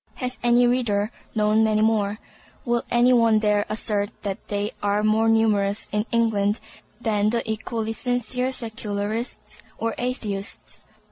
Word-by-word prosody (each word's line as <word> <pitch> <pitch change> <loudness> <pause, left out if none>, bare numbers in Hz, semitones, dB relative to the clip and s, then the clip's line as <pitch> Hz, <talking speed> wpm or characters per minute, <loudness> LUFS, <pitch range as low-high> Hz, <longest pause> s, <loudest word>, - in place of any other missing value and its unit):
Has 250 -1 -3
any 240 0 +4
reader 235 -4 +1 0.2
known 215 +1 +3
many 215 -1 +2
more? 215 -2 +1 0.5
Will 240 -1 +1
any 245 +1 +4
one 230 -2 +5
dare 210 -1 +2
assert 210 -1 -1
that 195 -2 -4
they 205 +1 -2
are 205 +1 +1
more 220 +1 +3
numerous 210 -2 +2
in 210 +2 -1
England 220 -3 +2 0.4
than 210 -3 +1
the 235 +1 -1
equally 220 0 -2
sincere 245 +2 -1
Secularists 220 -1 -3 0.2
or 225 0 -1
Atheists? 215 -5 -3
220 Hz, 135 wpm, -24 LUFS, 210-235 Hz, 0.5 s, one